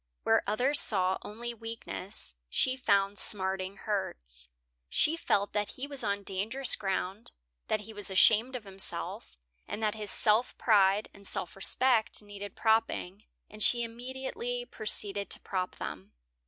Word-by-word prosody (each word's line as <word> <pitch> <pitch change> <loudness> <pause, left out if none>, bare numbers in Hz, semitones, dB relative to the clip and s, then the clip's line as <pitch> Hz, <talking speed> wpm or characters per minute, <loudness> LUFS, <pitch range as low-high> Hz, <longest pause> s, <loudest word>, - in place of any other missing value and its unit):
Where - - +3
others 250 +8 +3
saw 190 -3 +3
only 235 +3 -7
weakness, 225 - -7 0.2
she 255 - +1
found 200 -5 +1
smarting 190 -1 +2
hurts. - - -4 0.4
She 315 - +2
felt 205 -11 0
that 210 -1 -2
he 260 - -3
was 280 -2 -3
on 200 0 -2
dangerous 220 +8 +2
ground, 195 +1 -4 0.4
that 215 - 0
he 220 +2 -8
was 205 -2 -2
ashamed 220 +6 +4
of 245 - -5
himself, 195 - -4 0.3
and 220 - -5
that 210 -1 +1
his 215 -2 -2
self 220 +3 +2
pride 205 -2 +3
and 200 -1 -5
self 175 - -1
respect 225 +3 +4
needed 205 -1 -9
propping, 220 -3 0 0.2
and 215 +1 -12
she 240 +2 +3
immediately 265 - -5
proceeded 205 - +2
to - - +3
prop 185 -2 -4
them. 95 +2 -8
210 Hz, 145 wpm, -30 LUFS, 195-235 Hz, 0.4 s, ashamed